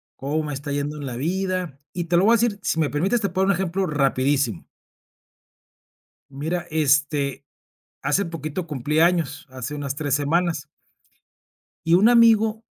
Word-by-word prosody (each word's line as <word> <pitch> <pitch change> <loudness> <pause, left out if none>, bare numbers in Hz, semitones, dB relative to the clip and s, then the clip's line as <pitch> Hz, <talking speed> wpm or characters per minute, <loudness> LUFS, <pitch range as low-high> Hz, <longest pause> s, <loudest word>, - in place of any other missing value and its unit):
cómo 145 +4 -2
me 150 -1 -4
está 145 +2 -6
yendo 145 +1 -2
en 145 - -6
la 125 -3 -5
vida. 180 0 -2
Y 175 -2 -3
te 170 +1 +2
lo 185 - +4
voy 225 - +6
a 235 - +5
decir 220 -3 0
Si 165 - 0
me 155 -3 +1
permites, 195 +11 0
te 200 - 0
puedo 185 +2 0
dar - - +4
un 180 - -2
ejemplo 190 +1 -1
rapidísimo. 140 - 0 1.7
Mira, 160 +5 -3
este, 145 -2 +1 0.6
hace 200 - +1
poquito 165 +1 -5
cumplí 150 0 -2
años. 170 -2 +1
Hace 130 +2 -6
unas 140 -2 -3
3 145 -2 -1
semanas. 155 +1 0 1.2
Y 165 - +3
un 195 +6 +6
amigo 225 -2 +4
160 Hz, 165 wpm, -23 LUFS, 145-185 Hz, 1.7 s, voy